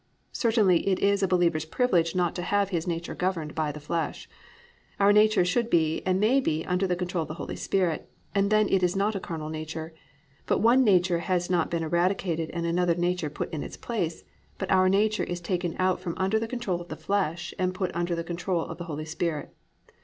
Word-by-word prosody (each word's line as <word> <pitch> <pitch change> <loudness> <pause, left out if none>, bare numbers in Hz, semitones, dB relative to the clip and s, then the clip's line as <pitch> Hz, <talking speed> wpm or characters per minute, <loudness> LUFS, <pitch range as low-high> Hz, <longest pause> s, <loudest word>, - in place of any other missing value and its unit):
Certainly 215 -8 +2
it 190 -2 +3
is 200 0 +2
a 195 - +3
believer's 170 -4 +2
privilege 170 -2 +1
not 175 -2 +1
to 180 - -4
have 200 +2 +1
his 170 -3 -2
nature 170 0 -3
governed 175 -5 -2
by 155 -2 -1
the 150 - -8
flesh. 160 +2 -3 0.7
Our 200 +1 +5
nature 215 -3 +5
should 230 +6 +1
be 160 -4 +2
and 185 0 +2
may 230 +7 +4
be 160 - -1
under 180 +1 0
the 180 - +1
control 180 -1 -2
of 155 - -4
the 155 - -6
Holy - - -5
Spirit, 180 -5 -1 0.2
and 200 0 +2
then 215 0 +4
it 190 - +2
is 180 0 +1
not 200 +2 +1
a 195 - -2
carnal 160 -4 -5
nature; 160 +1 -6 0.5
but - - +2
one 245 +4 +5
nature 180 -5 +3
has 175 0 -1
not 175 -3 +2
been 170 -1 -1
eradicated 170 0 0
and 170 -1 -3
another 170 0 +2
nature 175 -2 0
put 150 - -5
in 155 - -3
its - - -7
place, 175 -9 -3 0.3
but 190 - -3
our 185 0 +5
nature 215 +3 +2
is 175 0 -3
taken 175 -1 -2
out 185 0 +1
from 170 - -4
under 195 +4 +1
the 225 - -3
control 225 -8 -2
of 175 - -10
the - - -6
flesh 175 -4 -1
and 185 0 0
put 185 -2 -2
under 175 0 0
the 170 - -3
control 170 0 -2
of - - -8
the 175 - -5
Holy 155 -2 -5
Spirit. 160 -1 -3
180 Hz, 220 wpm, -27 LUFS, 165-195 Hz, 0.7 s, Our